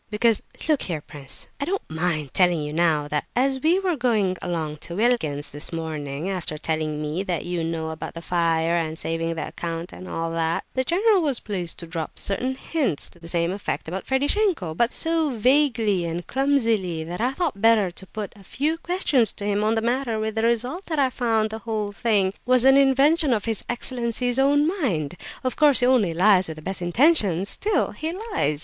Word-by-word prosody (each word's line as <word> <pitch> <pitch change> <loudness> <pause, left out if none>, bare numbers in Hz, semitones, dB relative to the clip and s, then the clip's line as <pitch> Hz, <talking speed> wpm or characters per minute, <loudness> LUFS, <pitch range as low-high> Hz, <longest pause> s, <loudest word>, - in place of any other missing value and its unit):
"Because 220 +1 +2 0.3
look 305 -3 +2
here, 165 -4 -2
prince, 140 -2 -6
I 280 - -1
don't 390 +4 -3
mind 160 -3 -2
telling 175 -3 +4
you 150 0 -5
now 155 -3 +2
that 150 -1 -1
as 265 +1 +1
we 330 +5 +3
were 375 -3 0
going 220 -8 +1
along 160 -3 -3
to 170 +3 -8
Wilkin's 190 -11 +1
this 145 +1 -4
morning, 155 -2 -4
after 180 -5 -3
telling 155 -1 -2
me 155 +5 -2
what 175 -5 -3
you 175 -1 -2
know 160 -1 -3
about 160 - -7
the 165 - -6
fire, 165 -1 +1
and 160 -2 -1
saving 165 +1 -2
the 160 - -5
count 170 +1 -5
and 185 - -9
all 165 0 -3
that, 165 0 -1
the 260 - 0
general 390 - +3
was 280 -6 0
pleased 180 -6 -4
to 170 - -7
drop 165 -2 -5
certain 255 +6 -2
hints 265 - -2
to 175 - -20
the 170 - -11
same 170 0 0
effect 200 -3 -4
about 185 +4 -5
Ferdishenko, 285 - +2
but 235 +7 +2
so 325 -2 +2
vaguely 235 -5 +2
and 170 +1 -4
clumsily 230 - +1
that 175 +5 -5
I 250 +3 +1
thought 280 - -2
better 225 -5 +4
to 190 +2 -9
put 210 +1 -6
a 200 - -16
few 305 - -1
questions 300 - +1
to 200 - -7
him 205 0 +1
on 220 +1 +2
the 225 - +1
matter, 240 -1 0
with 220 0 -2
the 220 - -1
result 245 - 0
that 315 - -2
I 270 -2 +2
found 225 -3 0
the 220 - -5
whole 215 -2 -3
thing 205 -3 +1
was 255 -1 +3
an 270 +1 +7
invention 275 +2 +4
of 210 -3 -1
his 225 -3 -1
excellency's 245 0 -1
own 290 +2 +4
mind. 165 - -1 0.3
Of 255 - -1
course, 290 -4 +4
he - - +4
only 225 -10 +3
lies 190 +1 +5
with 160 - -5
the 155 - -12
best 190 +1 -4
intentions; 200 - +3
still, 425 +1 0
he 320 +1 -4 0.2
lies. 145 0 +1
210 Hz, 205 wpm, -24 LUFS, 165-260 Hz, 0.3 s, an